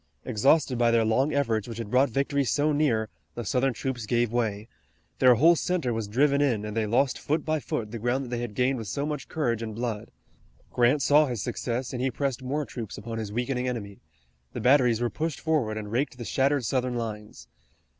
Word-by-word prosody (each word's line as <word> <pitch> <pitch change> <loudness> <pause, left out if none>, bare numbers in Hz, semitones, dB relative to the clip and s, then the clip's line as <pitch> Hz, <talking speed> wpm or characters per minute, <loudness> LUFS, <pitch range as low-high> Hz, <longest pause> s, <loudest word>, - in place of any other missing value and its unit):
Exhausted 130 +2 +2
by 120 -1 +4
their 115 -1 +3
long 130 +7 +2
efforts 115 -8 0
which 115 -2 -7
had 115 -3 -6
brought 130 +2 +4
victory 140 +3 0
so 145 +4 +1
near 135 -8 +1 0.3
the 120 - -5
Southern 130 +5 +1
troops 120 -1 -4
gave 120 -1 +1
way. 110 -3 -1 0.5
Their 125 -1 +7
whole 165 +8 +6
center 165 -8 -1
was 110 -2 -3
driven 140 +6 +2
in, 115 -7 +1
and 105 0 -5
they 110 -1 0
lost 125 +5 +1
foot 155 +3 -1
by 155 0 0
foot 110 -6 -4
the 115 - -5
ground 125 +4 0
that - - -8
they 120 -1 -2
had 120 -4 -5
gained 130 +2 +1
with 110 - -6
so 140 +8 -2
much 150 -2 -4
courage 120 -8 -1
and 110 -2 -5
blood. 115 -2 -4 0.6
Grant 125 +4 +3
saw 145 +4 +5
his 120 -7 -3
success 125 +1 -3
and 125 - -3
he 130 - +1
pressed 135 0 -2
more 145 +4 -2
troops 115 -6 -7
upon 115 -1 -5
his 105 -2 -5
weakening 125 +2 -1
enemy. 100 -5 -5 0.5
The - - -4
batteries 125 -1 +4
were 120 - 0
pushed 160 -2 -3
forward 140 -10 0
and 105 -1 -6
raked 125 +2 -1
the 120 - -6
shattered 135 +6 +1
Southern 125 +2 0
lines. 105 - -6
125 Hz, 215 wpm, -27 LUFS, 115-140 Hz, 0.6 s, Their